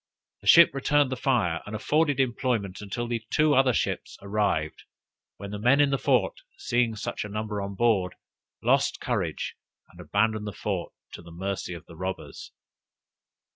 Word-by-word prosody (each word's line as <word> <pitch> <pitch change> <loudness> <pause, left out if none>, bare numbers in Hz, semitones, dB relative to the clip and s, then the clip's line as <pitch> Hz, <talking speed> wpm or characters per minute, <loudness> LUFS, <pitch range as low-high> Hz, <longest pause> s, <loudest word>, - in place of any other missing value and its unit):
The 100 - -10
ship 170 +9 +8
returned 140 0 +2
the - - 0
fire, 120 - +1
and 105 - -5
afforded 145 +5 +1
employment 115 -6 -1
until 110 +4 -4
the 115 -1 -2 0.3
other 130 0 +5
two - - +1
ships - - -3
arrived, 100 -7 -1 0.5
when 100 0 -8
the 105 - -5
men 125 +6 +4
in 145 -1 +4
the 135 - +1
fort - - +1 0.2
seeing 120 - 0
such 110 - -4
a 105 - -7
number 105 0 -3
on 100 0 -5
board, 100 -5 +1 0.5
lost - - +2
courage, - - -2 0.4
and - - -18
abandoned 110 +1 0
the 105 - -5
fort - - -3 0.2
to - - -9
the 85 - -13
mercy 90 +1 -4
of 85 - -11
the 85 - -13
robbers. 95 +2 -6
110 Hz, 170 wpm, -27 LUFS, 100-130 Hz, 0.5 s, ship